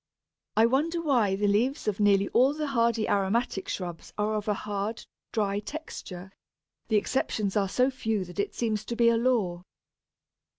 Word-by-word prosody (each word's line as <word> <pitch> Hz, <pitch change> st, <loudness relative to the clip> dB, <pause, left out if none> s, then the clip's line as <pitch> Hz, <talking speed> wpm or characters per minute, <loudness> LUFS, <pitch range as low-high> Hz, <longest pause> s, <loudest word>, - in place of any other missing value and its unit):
I 220 Hz, -, +6 dB
wonder 300 Hz, +8 st, +1 dB
why 245 Hz, -12 st, +2 dB
the 205 Hz, +1 st, -1 dB
leaves 220 Hz, +8 st, +1 dB
of 210 Hz, -1 st, 0 dB
nearly 200 Hz, -1 st, +4 dB
all 265 Hz, +4 st, +3 dB
the 305 Hz, 0 st, -2 dB
hardy 235 Hz, -5 st, +1 dB
aromatic 200 Hz, +1 st, 0 dB
shrubs 175 Hz, -3 st, -5 dB
are 210 Hz, +1 st, 0 dB
of 210 Hz, -1 st, -3 dB
a 210 Hz, -, +2 dB
hard, 205 Hz, +3 st, -4 dB, 0.3 s
dry 205 Hz, -2 st, 0 dB
texture; 200 Hz, -, -8 dB, 0.6 s
the 220 Hz, -, +1 dB
exceptions 210 Hz, -3 st, -1 dB
are 200 Hz, -2 st, +1 dB
so 255 Hz, +6 st, +2 dB
few 220 Hz, -6 st, -2 dB
that 180 Hz, +1 st, -10 dB
it 200 Hz, -, -1 dB
seems 220 Hz, -3 st, -1 dB
to 235 Hz, -, -4 dB
be 235 Hz, 0 st, +5 dB
a 230 Hz, -, +3 dB
law. 225 Hz, -8 st, +1 dB
215 Hz, 170 wpm, -28 LUFS, 200-240 Hz, 0.6 s, I